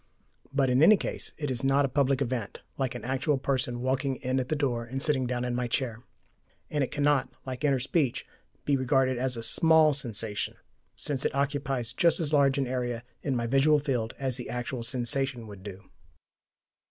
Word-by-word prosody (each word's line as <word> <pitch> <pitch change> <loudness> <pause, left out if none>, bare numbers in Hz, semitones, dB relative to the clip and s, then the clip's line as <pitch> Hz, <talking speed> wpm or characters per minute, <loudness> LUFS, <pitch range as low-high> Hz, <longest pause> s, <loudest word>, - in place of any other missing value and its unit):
But 135 -2 +2
in 125 +2 +3
any 210 +6 +8
case - - -5
it 145 -3 -3
is 120 -1 -1
not 135 +1 +3
a - - +1
public 135 0 +1
event, 120 -5 -4
like 130 -2 -2
an 120 - -6
actual 135 +3 0
person 130 -3 -1
walking 130 +1 0
in 130 +1 -1
at 130 - -3
the 155 - +1
door 130 -5 -1
and 130 +3 -5
sitting 135 -3 +2
down 125 0 -2
in 125 - -2
my 125 0 -1
chair. 115 -1 -2 0.7
And 150 -2 +1
it 130 - -2
cannot, 145 -3 +1 0.2
like 130 +1 -6
inner 140 -2 +3
speech, 135 +1 0 0.4
be 145 - +3
regarded 130 -1 +1
as 130 -1 -1
a 115 - -5
SMALL 160 +4 +5
sensation, 110 -6 -1 0.4
since 140 -3 -1
it - - -1
occupies 135 -4 -1
just 170 +5 +3
as 155 -2 -2
large 140 -2 +4
an 135 - +1
area 120 -2 -3 0.2
in 135 -3 -1
my 120 -1 -1
visual 135 +5 +4
field 125 -6 -2
as 130 -2 -1
the 125 - -6
actual 120 +1 -4
sensation 125 0 0
would 100 -3 -11
do. 95 0 -10
130 Hz, 195 wpm, -28 LUFS, 120-140 Hz, 0.7 s, any